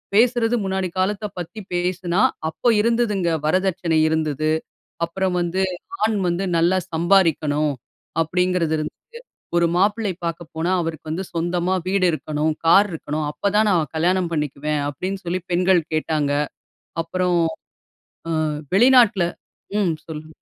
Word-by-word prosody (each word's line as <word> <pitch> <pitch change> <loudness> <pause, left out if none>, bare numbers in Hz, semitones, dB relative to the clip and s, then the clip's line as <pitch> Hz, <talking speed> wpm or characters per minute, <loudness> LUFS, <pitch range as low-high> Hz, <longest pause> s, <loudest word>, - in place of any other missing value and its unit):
பேசுறது 235 +1 +3
முன்னாடி 190 -1 -1
காலத்தப் 205 +2 -1
பத்தி 175 +6 -7
பேசுனா, 180 +1 0 0.3
அப்போது 225 +7 +1
இருந்ததுங்க 220 -5 +1 0.2
வரதட்சணை 180 -1 +1
இருந்தது. 155 -1 0 0.5
அப்பறம் 185 +2 -2
வந்து 175 +2 -1 0.4
ஆண் 215 0 +2
வந்து 175 +2 0
நல்லா 175 +3 +3
சம்பாரிக்கணும் 160 -4 +2 0.5
அப்டிங்கறது 180 0 +1
இருந்தது. 155 - -3 0.6
ஒரு 170 0 +4
மாப்பிள்ளை 205 +2 +1
பாக்க 170 0 -3
போனா 165 +3 0
"அவருக்கு 160 -2 -5
வந்து 165 +5 -2
சொந்தமா 175 +2 0
வீடு 190 0 +2
இருக்கணும், 155 0 -1
கார் 195 +5 +6
இருக்கணும். 155 -1 -3
அப்ப 200 +6 -1
தான் 215 +1 +4
நான் 165 -5 +1
கல்யாணம் 175 +2 +1
பண்ணிக்குவேன்" 150 0 -1
அப்டின்னு 190 +8 -5
சொல்லி 180 +2 -2
பெண்கள் 180 0 +4
கேட்டாங்க. 155 -2 0 0.7
அப்புறம் 180 +1 0 0.9
அ - - 0 0.4
வெளிநாட்ல 235 -4 +6 0.5
ம்ம் 195 -5 +2
சொல்லுங்க. 155 0 -8
175 Hz, 125 wpm, -22 LUFS, 160-190 Hz, 0.9 s, கார்